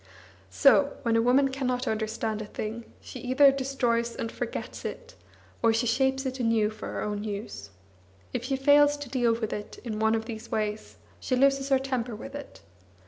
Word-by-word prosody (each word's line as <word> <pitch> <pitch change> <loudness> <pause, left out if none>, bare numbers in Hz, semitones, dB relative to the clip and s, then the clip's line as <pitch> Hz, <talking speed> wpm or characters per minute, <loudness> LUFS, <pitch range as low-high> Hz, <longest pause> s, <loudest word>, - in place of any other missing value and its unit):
So, 95 - +4
when 230 -2 +2
a 230 - +4
woman 260 +4 +4
cannot 255 -2 -2
understand 220 0 -2
a 210 - -6
thing, 220 +3 -5 0.2
she 255 - -9
either 260 +3 +5
destroys 245 -4 -1
and 225 - -4
forgets - - -5
it, - - -7 0.5
or 230 - +4
she 225 +2 +1
shapes 265 +3 +1
it 260 0 -3
anew 225 -3 +2
for 215 - -8
her - - -4
own 210 0 -3
use; 200 - -6 0.6
if - - -2
she 270 +1 0
fails 290 +2 +5
to 290 -3 -8
deal 240 -3 +2
with 225 -2 -3
it 210 - -6
in 220 -3 -4
one 220 +1 +3
of 220 0 -2
these 225 -1 -7
ways, 210 0 -3 0.2
she 255 - -1
loses 275 +1 +3
her 270 - +5
temper 255 -3 -3
with 275 +6 -9
it. 285 -1 -9
240 Hz, 190 wpm, -27 LUFS, 220-270 Hz, 0.6 s, either